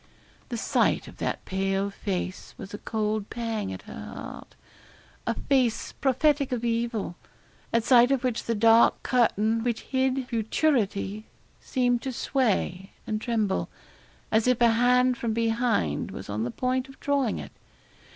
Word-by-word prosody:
The 240 - -3
sight - - +1
of - - -12
that - - -3
pale 195 +1 -1
face 185 -2 -4
was 195 - -9
a 205 - -5
cold 215 -1 -2
pang 225 -3 -3
at - - -7
her - - -9
heart - - -9 0.7
a - - +1
face 255 -5 +1
prophetic 280 +1 +1
of 240 -1 -2
evil, 230 -5 -1 0.5
at 230 -1 +2
sight 245 0 +6
of 270 -2 +1
which 250 -3 -1
the 230 - 0
dark 225 +2 +5
curtain 225 -2 +2
which 235 -2 -1
hid 260 -1 0
futurity 220 -4 0 0.3
seemed 245 -2 0
to 265 - -3
sway 205 -8 -1
and 215 0 -2
tremble, 220 -5 0 0.6
as 220 +2 +3
if 250 -2 +3
a 235 -1 +5
hand 250 +2 +3
from 230 -2 -1
behind 225 - 0
was - - -7
on 110 +2 -1
the - - -2
point 255 - -1
of 270 - -14
drawing 280 -5 0
it. - - -7
230 Hz, 150 wpm, -27 LUFS, 210-250 Hz, 0.7 s, sight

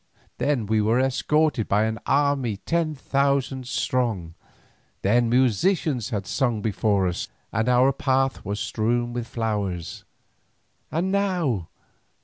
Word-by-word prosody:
Then 130 -3 +1
we 110 +1 +2
were 110 +4 +2
escorted 135 0 +1
by 105 +2 +2
an 110 0 -1
army 140 -6 +1
ten 165 +5 -1
thousand 140 -2 0
strong, 115 -10 -1 0.7
then 115 +4 +3
musicians 130 - +2
had 100 -3 -3
sung 120 0 0
before 100 -2 +1
us 90 - -3 0.2
and 110 +2 0
our 125 +2 +4
path 135 0 0
was 100 +2 -3
strewn 120 +2 -1
with 120 -1 -4
flowers. 100 -8 -3 0.9
And 175 +4 -1
now! 175 - 0
120 Hz, 125 wpm, -24 LUFS, 110-140 Hz, 0.9 s, our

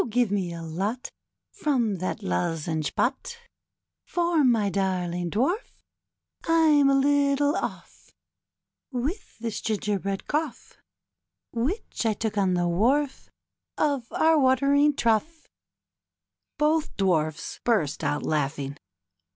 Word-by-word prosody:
give 235 -2 +1
me 190 -4 -1
a 165 -1 -7
lot 195 - -3 0.4
From 250 - 0
that 185 +1 -4
lozenge 155 - -2
pot^ 475 - -1 0.8
For^ 340 -3 +2
my 230 -5 +3
darling 180 -3 -1
Divarf, 305 - -1 0.7
Fm 310 -4 +4
a - - +4
little 285 +1 +3
off - - -6 0.8
With 280 - -4
this 225 -2 -4
gingerbread 200 -2 -2
congh 300 -4 -3 0.8
Which 265 - -2
I 220 - +2
took 220 0 -3
on 190 -3 +2
the 175 0 +1
wharf 255 +11 +1 0.5
Of 280 -5 0
our 320 -1 +3
watering 280 +2 +3
troughr 275 +8 0 1.1
Both 305 +1 +1
dwarfs 160 -5 0
burst 190 -12 +1
out 145 - -1
laughing. 145 -2 -2
230 Hz, 110 wpm, -26 LUFS, 180-290 Hz, 1.1 s, Fm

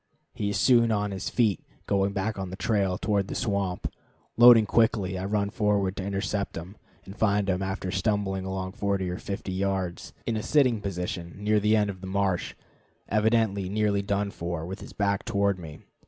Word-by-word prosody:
He 100 - -2
is 100 - -1
soon 115 +1 +4
on 105 -1 0
his 95 -1 -4
feet, 110 -5 +1 0.2
going 100 0 +1
back 100 +1 -2
on 95 -1 -4
his 95 - -7
trail, 100 -4 +1
toward 100 -2 0
the - - -5
swamp. 100 -4 -1 0.5
Loading 120 -2 +8
quickly, 105 -3 +2
I 95 +1 -3
run 100 0 0
forward 100 -3 +1
to 95 - -3
intercept 100 +1 -2
him, 90 +5 -8 0.3
and 95 - -10
find 105 -2 +1
him, 95 -1 0
after 95 -1 -3
stumbling 95 -1 0
along 95 0 -4
40 100 -2 -1
or 90 - -5
50 100 -1 -5
yards, 95 -2 -2
in 115 - -1
a 110 - -1
sitting 130 -5 +3
position 90 -3 -4
near 105 +1 +2
the 105 +1 +3
edge 105 -1 +2
of 95 -2 -7
the 95 - -6
marsh, 95 -1 -1 0.5
evidently 105 -3 +2
nearly 105 0 +1
done 100 0 -1
for, 85 -2 -4
with 95 +3 -7
his - - -9
back 100 -1 0
toward 100 -1 +1
me. 80 -3 -10
100 Hz, 190 wpm, -27 LUFS, 95-105 Hz, 0.5 s, Loading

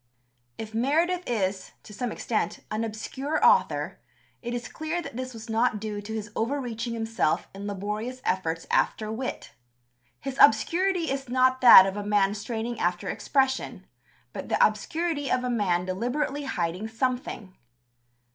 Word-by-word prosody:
'" 120 -1 -45
If 220 0 -11
Meredith 330 +10 +1
is 195 -4 -1
to 210 - -12
some 245 +2 -3
extent 220 0 -2
an 215 +1 -1
obscure 265 +7 -3
author, 475 0 +3 0.4
it 240 0 -4
is 240 -1 -4
clear 315 +2 -3
that 345 - -7
this 255 +1 -4
was 225 -2 -10
not 225 -1 +1
due 210 -1 -4
to 215 +2 -7
his 210 -1 -5
over 255 +6 0
reaching 235 -2 -4
himself 225 -8 0
in 200 +1 -7
laborious 210 +5 -4
efforts 165 -3 -1
after 215 -1 +1
wit. 250 +4 -5 0.7
His 270 0 -6
obscurity 340 - +4
is 270 -2 -3
not 255 +1 +3
that 235 -6 +11
of 195 +1 -3
a 205 - -3
man 205 -1 +2
straining 225 +2 -4
after 175 0 -1
expression, 265 -1 0 0.5
but - - -7
the - - +5
obscurity 320 -4 -1
of 255 - +1
a 250 - -1
man 180 -6 +1
deliberately 250 +9 -2
hiding 180 -3 -2
something. 230 -4 -3
230 Hz, 155 wpm, -26 LUFS, 205-265 Hz, 0.7 s, that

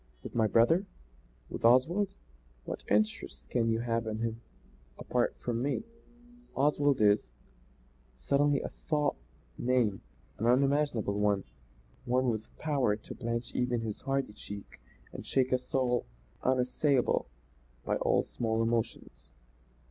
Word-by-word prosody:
"With - - -8
my 110 -2 +3
brother? 160 - +4 0.6
With - - -7
Oswald? 160 - +4 0.6
What - - -5
interest 105 -10 0
can 115 -2 +2
you 115 0 +1
have 115 -1 -1
in 110 0 -2
him 115 0 -3 0.6
apart 125 -1 0
from 120 -1 -2
me? 140 - -1 0.7
Oswald 145 0 +3
is 105 - +4 0.5
" - - -33
Suddenly 145 0 +3
a - - -4
thought 150 -2 -1 0.5
came 120 -6 +2 0.4
an 115 - +1
unimaginable 130 -5 +2
one; 100 -2 +2 0.6
one 125 0 +2
with 110 -1 -4
power 140 -9 +1
to 105 - -10
blanch 115 0 -3
even 125 -1 0
his 110 -2 -5
hardy 135 -5 -1
cheek 100 -1 -9 0.3
and - - -7
shake 130 -1 +1
a 130 - +3
soul 125 -1 0 0.3
unassailable 130 - +2 0.6
by - - +1
all - - +2
small 115 -1 -1
emotions. 115 0 -2
120 Hz, 130 wpm, -31 LUFS, 110-135 Hz, 0.7 s, brother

